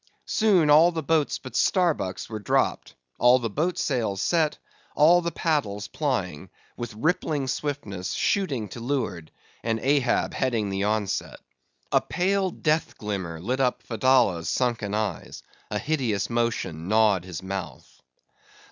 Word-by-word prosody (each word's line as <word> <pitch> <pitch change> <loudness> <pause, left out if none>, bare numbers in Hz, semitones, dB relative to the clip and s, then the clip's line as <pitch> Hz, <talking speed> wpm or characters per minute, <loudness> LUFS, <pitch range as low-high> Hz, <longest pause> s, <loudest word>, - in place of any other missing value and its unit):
Soon 190 -9 +3
all 160 +4 +7
the 160 -2 -4
boats 155 0 +1
but 130 -3 -10
Starbuck's 165 - +1
were 110 -2 -5
dropped; 100 - 0 0.2
all 125 +1 +6
the 115 -4 -3
boat 165 - -1
sails 115 -8 -1
set—all 165 - +2
the 170 0 -2
paddles 135 -12 -1
plying; 110 - -2 0.3
with 120 -3 -6
rippling 150 +1 0
swiftness, 125 -10 -3
shooting 145 - 0
to 120 - -8
leeward; 115 - -3 0.3
and 115 -1 0
Ahab 135 -1 +1
heading 115 -6 0
the 95 +1 -1
onset. 105 -2 -2 0.5
A - - +4
pale, 190 +2 0
death 155 -2 -1
glimmer 95 -6 -4
lit 125 +10 -2
up 125 -2 0
Fedallah's 115 -7 +2
sunken 115 -5 -1
eyes; 105 -5 -4 0.3
a 105 - -2
hideous 120 -7 -1
motion 110 -9 -1
gnawed 105 -3 +3
his 90 0 -7
mouth. 95 0 -7
120 Hz, 135 wpm, -25 LUFS, 100-150 Hz, 0.5 s, all